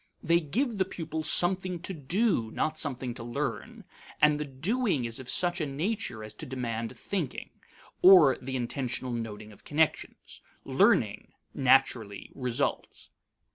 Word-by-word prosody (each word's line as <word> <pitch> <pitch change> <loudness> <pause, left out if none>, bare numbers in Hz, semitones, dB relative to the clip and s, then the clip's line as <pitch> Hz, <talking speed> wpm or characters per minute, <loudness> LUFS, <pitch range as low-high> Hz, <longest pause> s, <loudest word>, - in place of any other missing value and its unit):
They 170 +1 +4
give 220 - -2
the 190 - +3
pupils 160 -3 -4
something 180 0 +2
to 190 +1 -3
do, 165 - 0
not 155 +7 -2
something 130 -4 -2
to 120 - -8
learn; 120 0 -4 0.4
and 150 0 +4
the 150 - -2
doing 155 - -1
is 115 +1 -3
of 130 -1 -9
such 175 -1 +1
a 150 - -1
nature 150 - -3
as 110 0 -9
to 155 - -7
demand 120 -2 -4
thinking, 170 -1 -4 0.5
or 175 -8 +8
the 130 +1 -5
intentional 125 +1 -3
noting 110 -2 -6
of 105 - -18
connections; 155 +1 -1 0.2
learning - - +2 0.2
naturally 125 -6 +2
results. 130 +1 -2
140 Hz, 140 wpm, -28 LUFS, 120-175 Hz, 0.5 s, or